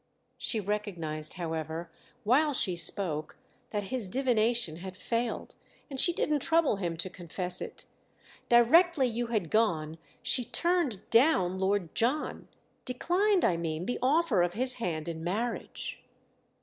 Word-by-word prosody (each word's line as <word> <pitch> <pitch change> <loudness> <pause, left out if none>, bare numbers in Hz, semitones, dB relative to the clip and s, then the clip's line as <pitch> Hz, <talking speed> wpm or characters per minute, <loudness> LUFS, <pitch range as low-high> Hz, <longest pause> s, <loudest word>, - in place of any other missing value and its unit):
She 225 - -1
recognised, 175 -7 -2
however, 165 -1 -4 0.3
while 285 +7 +3
she 185 -7 +1
spoke, 160 -2 +2 0.3
that 210 -1 -3
his 235 -7 -1
divination 235 - +1
had 185 +1 -9
failed, 230 +4 -3 0.4
and 270 - -5
she 345 - +4
didn't 300 -3 0
trouble 325 -5 +2
him 170 -4 -3
to 175 - -2
confess 180 0 -5
it. - - -8 0.6
"Directly 275 +6 +5
you 240 0 -2
had 210 -9 -2
gone 165 -8 0 0.2
she 250 - +3
'turned 330 - 0
down' 210 - +3
Lord 190 -3 0
John. 265 +7 -1 0.4
Declined, 360 +9 +1
I 170 - +2
mean, 165 0 -3
the 245 - -3
offer 270 - +2
of 175 0 0
his 255 +4 +6
hand 160 -5 -3
in 165 -1 -5
marriage." 220 +7 -4
210 Hz, 135 wpm, -29 LUFS, 175-255 Hz, 0.6 s, his